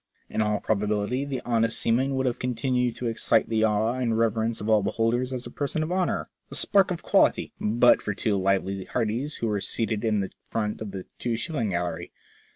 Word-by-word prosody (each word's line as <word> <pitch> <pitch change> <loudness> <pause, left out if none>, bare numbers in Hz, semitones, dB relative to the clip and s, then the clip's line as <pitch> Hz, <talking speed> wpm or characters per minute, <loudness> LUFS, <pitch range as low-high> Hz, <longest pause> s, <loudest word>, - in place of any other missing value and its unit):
In - - 0
all 105 -1 +1
probability 105 +5 0
the 135 -3 -4
honest 115 -1 +1
seaman 130 +4 +1
would 130 0 0
have 125 -2 -1
con 125 -1 -2
tinued 125 0 0
to 125 - -5
excite 115 -1 +2
the 110 -1 +1
awe 110 +1 +2
and 120 -3 0
reverence 115 0 +1
of 105 - -5
all 110 -1 +4
beholders 115 +5 0
as 125 -1 -3
a 120 - -8
person 145 +4 -2
of 160 - -4
honour, 185 -1 0 0.2
a - - -7
spark 195 -2 +4
of 175 -2 -4
quality, - - +3
but 120 +3 +4
for 105 - -3
two 105 0 0
lively 95 0 0
hearties 125 +6 -2
who 115 - -2
were 105 -2 -1
seated 110 0 -1
in 110 -2 +2
the 95 - -3
front 105 -1 -3
of 110 - -4
the 95 -1 -7
two 120 -2 -1
shilling 140 -6 -2
gallery. 90 -1 -3
115 Hz, 210 wpm, -26 LUFS, 105-125 Hz, 0.2 s, all